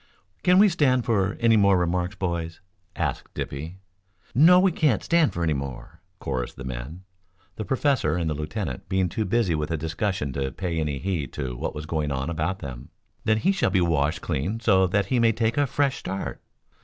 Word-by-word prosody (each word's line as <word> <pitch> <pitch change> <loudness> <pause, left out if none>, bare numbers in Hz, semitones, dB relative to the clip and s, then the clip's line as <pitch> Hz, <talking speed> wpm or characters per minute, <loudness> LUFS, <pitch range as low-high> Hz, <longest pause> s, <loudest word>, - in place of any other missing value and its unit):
"Can 180 0 +4
we 205 +2 +7
stand 140 - +2
for 100 -4 +1
any 115 -1 +4
more 100 -3 +5
remarks, 90 +2 -1
boys?" 85 -3 -3 0.4
asked - - -3
Dippy. 80 +6 -5 0.6
"No, 165 +8 +7
we 190 0 +4
can't 150 - +1
stand 170 -3 +3
for 85 - -3
any 80 -2 +2
more," 70 +4 -6 0.2
chorused 65 -7 -4
the - - -8
men, 65 +8 -6 0.5
the 110 - -4
professor 135 -2 +1
and 85 -2 -1
the 80 - 0
lieutenant 75 - -5
being 95 -1 +1
too 110 +6 -2
busy 105 -3 +1
with 75 -1 -2
a 80 - -1
discussion 80 -1 -2
to 65 0 -2
pay 85 -3 -3
any 75 -3 -1
heed 85 -5 -3
to 60 -2 -4
what - - -4
was 75 0 -5
going 75 -2 -2
on 70 +4 -2
about 85 +3 -1
them. 65 -7 -8 0.4
"Then 110 -1 +3
he 185 - +2
shall 190 - +1
be 95 0 +2
washed 80 -3 +1
clean 85 +8 -2
so 95 -5 +4
that 100 +2 +1
he 120 +6 +1
may 115 -1 +4
take 115 +1 0
a 145 -1 +2
fresh 140 +1 0
start?" 95 +1 -5
90 Hz, 200 wpm, -25 LUFS, 75-115 Hz, 0.6 s, we